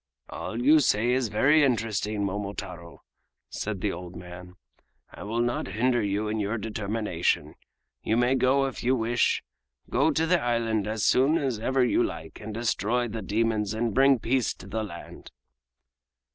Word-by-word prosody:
"All 115 - -5
you 150 +6 +6
say 120 -3 +2
is 130 -1 +1
very 140 +9 +4
interesting, 110 -5 0
Momotaro," 100 -3 -6 0.5
said 100 -3 -4
the 105 - 0
old 90 0 -8
man. 90 +1 -10 0.6
"I - - -12
will 115 +3 -2
not 120 0 -1
hinder 120 0 +2
you 105 +1 -1
in 110 +1 -2
your 105 +3 -1
determination. 105 -4 -1 0.5
You 110 - 0
may 120 +2 +3
go 135 +1 +3
if 135 - -5
you 130 +2 +3
wish. 120 0 +1 0.5
Go - - +3
to 160 +1 +1
the 175 +1 +2
island 115 -3 0
as 110 -2 -1
soon 135 +6 +4
as 135 -8 -1
ever 130 +3 +2
you 120 - +2
like - - -4
and 110 - -6
destroy 115 +1 0
the 110 +1 -5
demons 110 +1 0
and 115 -1 -1
bring 135 0 +5
peace 125 +1 0
to - - -13
the 110 +3 -3
land." 95 -5 -9
110 Hz, 165 wpm, -27 LUFS, 105-125 Hz, 0.6 s, you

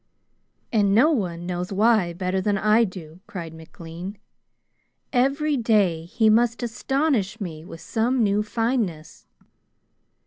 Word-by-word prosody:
"And 200 -3 +3
no 285 +9 +5
one 175 - -2
knows 180 +1 -4
why 210 -3 +3
better 185 +2 -2
than 205 +1 0
I 215 +3 +4
do," 175 -4 -10
cried 165 -4 -7
McLean. 165 +4 -9 1.0
"Every 280 +4 +1
day 205 -9 +1
he 220 +5 +1
must 230 +2 +3
astonish 240 -3 -1
me 160 -6 -6
with 165 -1 -11
some 235 +2 0
new 205 0 +2
fineness." 210 -8 -3
205 Hz, 125 wpm, -24 LUFS, 175-235 Hz, 1.0 s, no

